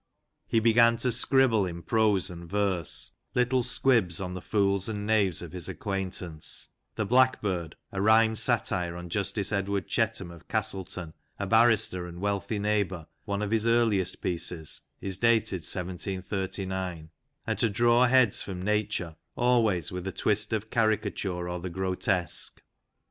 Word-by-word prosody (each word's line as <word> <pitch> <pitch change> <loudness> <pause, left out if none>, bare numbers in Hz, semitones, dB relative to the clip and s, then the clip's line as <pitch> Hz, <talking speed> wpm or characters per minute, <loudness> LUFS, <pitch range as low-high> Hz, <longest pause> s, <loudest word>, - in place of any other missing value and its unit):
He 115 - +2
began 115 +1 +5
to 125 +2 +1
scribble, 120 -4 +3
in 85 -1 -7
prose 105 -5 +2
and 85 -1 -9
verse, 95 -5 -1 0.2
little 125 +1 +2
squibs 115 -7 +2
on 90 -1 -4
the 90 - -6
fools 100 -1 +1
and 105 -2 -4
knaves 100 -6 +2
of 85 - -8
his 90 -3 -7
acquaintance 95 -5 -4
(" - - -51
The 110 - -1
Blackbird," 100 -9 +2 0.2
a 95 - -3
rhymed 110 +1 +4
satire 90 -2 +1
on 90 0 -8
Justice 100 +3 -1
Edward 100 -1 -1
Chetham, 110 -6 -1
of 85 -2 -14
Castleton, 90 -3 -3 0.2
a 100 - -3
barrister 110 -4 +3
and 85 0 -9
wealthy 100 +2 -1
neighbour, 100 -5 -1 0.2
one 100 +1 -2
of 105 - -3
his 115 0 +2
earliest 110 -6 +2
pieces, 85 -2 -2 0.2
is 95 -1 -2
dated 115 -4 +3
1739), 95 -1 -3 0.3
and - - -2
to 115 - +3
draw 120 +4 +4
heads 125 -4 +4
from 95 -2 -6
Nature, 100 -4 -1 0.2
always 115 -9 +2
with 90 0 -5
a - - -2
twist 105 +3 0
of 110 -1 -2
caricature 105 -5 0
or 90 0 -3
the 90 +2 -5
grotesque. 95 0 -1
100 Hz, 150 wpm, -28 LUFS, 90-110 Hz, 0.3 s, began